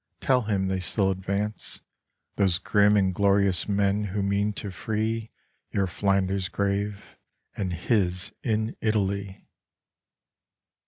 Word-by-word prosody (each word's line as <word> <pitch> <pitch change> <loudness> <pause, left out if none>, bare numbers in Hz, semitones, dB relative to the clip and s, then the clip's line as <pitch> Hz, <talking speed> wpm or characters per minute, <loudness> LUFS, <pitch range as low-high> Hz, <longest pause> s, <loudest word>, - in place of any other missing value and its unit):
Tell 130 -1 +3
him 100 -4 0
they 95 0 -1
still 95 +2 +1
advance, 100 +3 -3 0.5
Those 95 -4 +3
grim 105 +2 +3
and 95 -2 +2
glorious 100 -1 +3
men 100 +1 +1
who 100 +1 -2
mean 100 +1 +1
to 100 -1 -5
free 110 +3 -2 0.4
Your 100 -1 0
Flanders 95 0 0
grave, 100 0 -2 0.4
and 95 -3 -2
his 90 0 0
in 110 -1 -1
Italy 100 -3 -1
100 Hz, 115 wpm, -26 LUFS, 95-105 Hz, 0.5 s, Tell